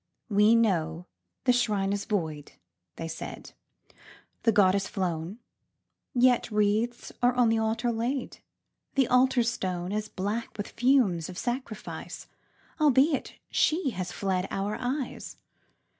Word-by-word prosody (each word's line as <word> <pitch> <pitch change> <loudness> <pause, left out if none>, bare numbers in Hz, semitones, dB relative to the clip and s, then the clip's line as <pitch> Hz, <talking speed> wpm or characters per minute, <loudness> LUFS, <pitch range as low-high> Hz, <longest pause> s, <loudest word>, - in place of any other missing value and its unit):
"We 210 +2 +5
know 175 -7 +1 0.4
the 250 - +4
Shrine 205 -5 +1
is 205 - -3
void," 160 -9 -3 0.4
they 165 - -5
said, 165 0 -7 0.9
"The 230 - +4
Goddess 200 -1 +3
flown 175 0 -3 0.8
Yet 245 -1 +4
wreaths 215 +3 0
are 245 0 +4
on 245 -2 +4
the 225 0 +2
Altar 220 +2 0
laid 240 +3 -3 0.6
The 270 -3 +3
Altar 250 0 +4
Stone 185 -6 -2
Is 215 +1 -2
black 210 +5 -3
with 205 - -4
fumes 230 - +2
of 180 - -8
sacrifice, 240 -1 -5 0.5
Albeit 285 0 +3 0.2
She 315 -3 +2
has 180 -3 -4
fled 190 -1 -1
our 200 +2 -2
eyes. 255 +1 -4
215 Hz, 125 wpm, -28 LUFS, 190-245 Hz, 0.9 s, We